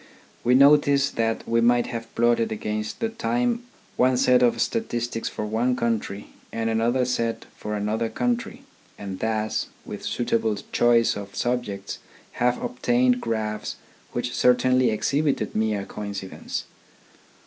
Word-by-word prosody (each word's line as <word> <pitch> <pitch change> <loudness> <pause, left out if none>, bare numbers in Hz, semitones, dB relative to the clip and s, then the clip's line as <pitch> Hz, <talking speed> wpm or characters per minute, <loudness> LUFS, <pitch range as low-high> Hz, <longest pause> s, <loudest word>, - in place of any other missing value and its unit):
We 125 +1 +4
notice 140 0 +5
that 115 -1 -1
we 115 0 +2
might 120 +1 +4
have 115 -1 -6
plotted 120 -1 +2
against 105 0 -3
the 225 - +1
time 240 +1 0 0.3
one 125 0 +4
set 125 -1 +4
of 120 -1 +3
statistics 120 - -1
for 105 - -4
one 115 +4 +1
country 115 -4 -2 0.2
and 115 0 -1
another 120 +3 +2
set 115 -2 -1
for 105 0 -4
another 110 +2 -1
country, 245 - -2 0.3
and 95 -2 -6
thus, 110 -1 -1 0.2
with - - -7
suitable 115 -3 0
choice 120 -1 +4
of 100 -1 -8
subjects, 120 -5 -2 0.4
have 125 0 +3
obtained 125 0 +2
graphs 110 -2 -2 0.4
which 120 0 -3
certainly 125 0 +4
exhibited 140 +1 0
mere 105 -2 0
coincidence. 100 -2 -5
115 Hz, 130 wpm, -24 LUFS, 110-125 Hz, 0.4 s, notice